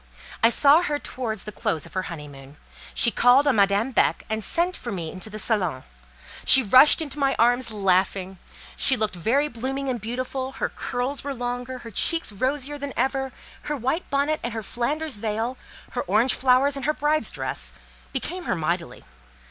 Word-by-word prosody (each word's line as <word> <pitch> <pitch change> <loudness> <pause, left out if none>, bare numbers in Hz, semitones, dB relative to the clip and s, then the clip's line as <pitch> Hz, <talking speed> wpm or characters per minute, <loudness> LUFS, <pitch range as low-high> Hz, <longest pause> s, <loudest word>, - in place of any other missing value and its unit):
I 230 - +6
saw 290 +6 +5
her 300 -4 -1
towards 230 -7 -4
the 210 - -7
close 160 -6 -2
of - - -15
her 185 - -1
honeymoon. 145 -3 -10 0.4
She 235 - +7
called 250 +5 +4
on 275 -6 +2
Madame 200 +5 +2
Beck, - - +1
and 220 0 -2
sent 345 - 0
for 240 - -7
me 170 -5 -4
into 185 +3 -8
the 215 - -8
salon. 185 - -1 0.6
She 265 0 +8
rushed 260 +9 +6
into 295 -1 -6
my 275 -1 +1
arms 245 +1 +2
laughing. 190 -2 0 0.4
She 265 - +4
looked 215 -3 -1
very 245 - +1
blooming 270 +2 -4
and 245 -4 -3
beautiful: 255 +3 -4
her - - -3
curls 255 +3 -3
were 280 -1 -4
longer, 245 +1 -4
her 235 -2 -11
cheeks 330 - +3
rosier 275 +6 -2
than 280 -1 -5
ever: 265 +1 -1 0.3
her 295 -1 -4
white 265 +8 -2
bonnet 285 +2 0
and 240 - -4
her 225 -1 -5
Flanders 285 +6 -2
veil, 225 +3 -3 0.4
her 245 - -2
orange 215 +7 +2
flowers 265 +2 +3
and 275 - -5
her 305 - +1
bride's 305 +1 +1
dress, - - -4 0.4
became 360 -1 -4
her - - 0
mightily. 170 +1 -3
245 Hz, 180 wpm, -24 LUFS, 210-275 Hz, 0.6 s, She